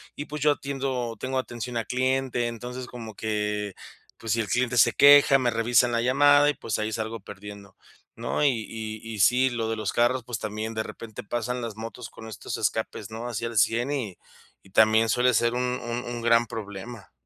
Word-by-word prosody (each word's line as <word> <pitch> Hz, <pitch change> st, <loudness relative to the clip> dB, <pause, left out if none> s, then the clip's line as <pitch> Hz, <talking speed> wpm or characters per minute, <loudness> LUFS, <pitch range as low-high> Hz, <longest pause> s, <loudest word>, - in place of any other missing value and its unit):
y, 145 Hz, -, -5 dB
pues, 150 Hz, -1 st, -7 dB
yo 150 Hz, -, +4 dB
atiendo 135 Hz, -4 st, -3 dB
tengo 130 Hz, +2 st, -2 dB
atención 120 Hz, -1 st, -4 dB
a 115 Hz, -, -2 dB
cliente, 130 Hz, -1 st, 0 dB
entonces, 125 Hz, +2 st, -6 dB
como 115 Hz, -3 st, -8 dB
que, 105 Hz, -1 st, -2 dB, 0.4 s
pues, 115 Hz, -, -2 dB
si 115 Hz, -, 0 dB
el 105 Hz, -, -1 dB
cliente 125 Hz, 0 st, +1 dB
se 110 Hz, -, +6 dB
queja, 140 Hz, -1 st, +7 dB
me 125 Hz, -2 st, +1 dB
revisan 120 Hz, +1 st, +3 dB
la 115 Hz, -, +2 dB
llamada 145 Hz, +3 st, +5 dB
y, -, -, +1 dB
pues, 115 Hz, -7 st, -3 dB
ahí 110 Hz, +1 st, -1 dB
salgo 110 Hz, +1 st, -3 dB
perdiendo, 100 Hz, 0 st, -11 dB, 0.4 s
¿no?, -, -, -2 dB
y 145 Hz, -, +6 dB, 0.2 s
y 110 Hz, -1 st, -6 dB
y 105 Hz, -, -6 dB
sí, 125 Hz, +6 st, +4 dB
lo 115 Hz, -2 st, -2 dB
de 115 Hz, -, -1 dB
los 110 Hz, -2 st, -2 dB
carros, 120 Hz, +1 st, +2 dB
pues, 120 Hz, -2 st, -4 dB
también 110 Hz, +1 st, -4 dB
de 110 Hz, -, -1 dB
repente 110 Hz, -2 st, -9 dB
pasan 120 Hz, +3 st, -3 dB
las 115 Hz, -3 st, -5 dB
motos 115 Hz, +1 st, -7 dB
con 110 Hz, -, -11 dB
estos 105 Hz, -, -6 dB
escapes, 105 Hz, -, -2 dB
¿no?, 115 Hz, +2 st, -5 dB
así 120 Hz, -1 st, -3 dB
al 115 Hz, -1 st, -4 dB
100 120 Hz, +6 st, +2 dB
y 115 Hz, -11 st, -3 dB, 0.5 s
y 95 Hz, -, -19 dB
también 110 Hz, +3 st, +4 dB
suele 125 Hz, +4 st, +3 dB
ser 120 Hz, +1 st, +2 dB
un 125 Hz, -, 0 dB, 0.2 s
un 120 Hz, +1 st, -4 dB
un 120 Hz, 0 st, -5 dB
gran 115 Hz, 0 st, +4 dB
problema. 105 Hz, 0 st, -8 dB
115 Hz, 205 wpm, -26 LUFS, 110-125 Hz, 0.5 s, queja